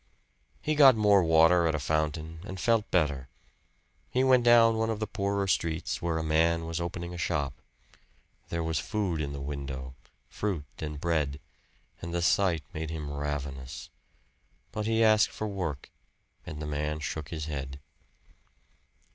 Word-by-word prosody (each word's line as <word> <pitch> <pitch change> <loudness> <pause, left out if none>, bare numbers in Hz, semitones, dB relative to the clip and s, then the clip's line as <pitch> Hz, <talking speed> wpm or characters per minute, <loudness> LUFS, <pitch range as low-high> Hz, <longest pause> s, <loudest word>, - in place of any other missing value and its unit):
He 155 - +1
got 140 -4 +8
more 105 -2 +5
water 80 +1 +5
at 80 - +1
a - - -1
fountain 80 +2 -2
and 95 -1 -7
felt 115 +1 +2
better. 70 -7 0 0.8
He 130 - +1
went 130 -2 +5
down 115 -1 +6
one 110 0 0
of 110 -2 -2
the 110 - -1
poorer 100 -1 -1
streets 85 -3 -1
where 85 -1 -1
a 80 - -2
man 80 +1 +2
was 85 +1 -3
opening 85 0 -4
a 90 - -6
shop. 70 -5 -1 1.0
There 85 0 -2
was 80 -1 0
food 95 -7 -2
in 70 -1 -3
the 70 - -5
window 70 -2 -5 0.3
fruit 95 -8 -3
and 75 -2 -5
bread 75 -4 0 0.6
and 85 +1 -5
the 85 - 0
sight 90 -4 +2
made 80 -1 -4
him 75 -3 -5
ravenous. 70 +2 -5 0.8
But 105 0 -3
he 115 0 +3
asked 110 -1 +5
for 110 - -4
work 90 -9 -4 0.6
and 75 - -6
the 75 - -4
man 75 +1 -2
shook 75 -1 -4
his 80 -2 -4
head. 70 -2 -5
80 Hz, 160 wpm, -29 LUFS, 75-100 Hz, 1.0 s, got